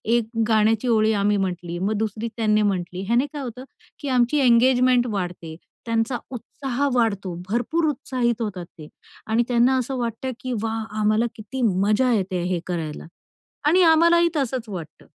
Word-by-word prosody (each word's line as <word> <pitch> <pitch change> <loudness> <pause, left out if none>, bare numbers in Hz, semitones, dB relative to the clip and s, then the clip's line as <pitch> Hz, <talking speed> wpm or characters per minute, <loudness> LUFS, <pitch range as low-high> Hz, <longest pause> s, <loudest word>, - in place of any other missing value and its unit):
एक 230 -2 0 0.2
गाण्याची 220 +2 +2
ओळी 220 -1 +3
आम्ही 205 0 +1
म्हटली, 175 -2 -3
मग 200 +3 0
दुसरी 220 +1 -2
त्यांनी 215 -1 +2
म्हटली. 185 -3 -1
ह्याने 240 +4 +2
काय 290 - -5
होतं, 250 0 -7 0.4
की 285 - -6
आमची 250 +3 +2
एंगेजमेंट 250 0 +4
वाढते. 175 -4 -4 0.3
त्यांचा 230 +2 0
उत्साह 265 +3 -3
वाढतो, 200 -6 0 0.2
भरपूर 245 +9 0
उत्साहित 250 -4 -1
होतात 185 -5 -4
ते 155 -2 -10 0.4
आणि 225 +2 +2
त्यांना 245 +1 +3
असं 260 +1 -2
वाटतं 240 +2 -3
की 255 -1 -4
"वाह! 225 0 -2 0.2
आम्हाला 215 +2 +2
किती 235 +5 -6
मजा 215 +4 +2
येते 185 -4 -1
हे 175 - 0
करायला" 160 -4 -4 0.6
आणि 365 +4 +5
आम्हालाही 340 +1 +5
तसंच 255 -5 -2
वाटतं. 165 -5 -8
225 Hz, 155 wpm, -23 LUFS, 200-255 Hz, 0.6 s, आणि